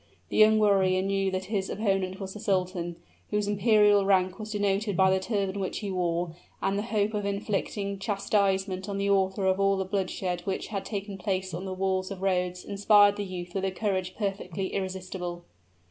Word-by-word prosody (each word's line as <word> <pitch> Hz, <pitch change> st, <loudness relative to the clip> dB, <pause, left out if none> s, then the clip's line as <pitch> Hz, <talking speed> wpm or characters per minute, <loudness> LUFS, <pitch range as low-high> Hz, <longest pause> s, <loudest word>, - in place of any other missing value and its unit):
The -, -, -2 dB
young 215 Hz, 0 st, +7 dB
warrior 190 Hz, -3 st, +3 dB
knew 195 Hz, 0 st, +1 dB
that 185 Hz, 0 st, -3 dB
his 195 Hz, -1 st, -2 dB
opponent 195 Hz, -3 st, -1 dB
was 190 Hz, -1 st, -5 dB
the 215 Hz, -, -8 dB
sultan, 180 Hz, -3 st, -1 dB, 0.3 s
whose 210 Hz, -1 st, 0 dB
imperial 205 Hz, 0 st, +4 dB
rank 185 Hz, -1 st, +2 dB
was 215 Hz, 0 st, -6 dB
denoted 205 Hz, -1 st, 0 dB
by 190 Hz, 0 st, +5 dB
the 190 Hz, -, +3 dB
turban 200 Hz, -1 st, -1 dB
which 190 Hz, -, -2 dB
he 205 Hz, -2 st, -4 dB
wore; 175 Hz, -2 st, -1 dB, 0.3 s
and 195 Hz, -, 0 dB
the 200 Hz, -, 0 dB
hope 215 Hz, -1 st, 0 dB
of 210 Hz, -1 st, -1 dB
inflicting 200 Hz, 0 st, -2 dB
chastisement 195 Hz, -1 st, 0 dB
on 200 Hz, -, -2 dB
the 200 Hz, 0 st, +1 dB
author 190 Hz, 0 st, +1 dB
of 190 Hz, 0 st, +2 dB
all 195 Hz, 0 st, +3 dB
the 190 Hz, -, -1 dB
bloodshed 185 Hz, -2 st, -2 dB
which 195 Hz, -2 st, -3 dB
had 200 Hz, -3 st, -4 dB
taken 200 Hz, -2 st, -5 dB
place 185 Hz, -2 st, -2 dB
on 175 Hz, +4 st, -4 dB
the 190 Hz, -, -4 dB
walls 190 Hz, 0 st, 0 dB
of 195 Hz, -1 st, -7 dB
Rhodes 180 Hz, -1 st, 0 dB
inspired 205 Hz, 0 st, +5 dB
the 205 Hz, -, -3 dB
youth 180 Hz, -2 st, -6 dB
with 195 Hz, -, -2 dB
a -, -, +1 dB
courage 185 Hz, -2 st, -2 dB
perfectly 195 Hz, -3 st, -3 dB
irresistible. 185 Hz, -2 st, -4 dB
195 Hz, 190 wpm, -28 LUFS, 185-205 Hz, 0.3 s, young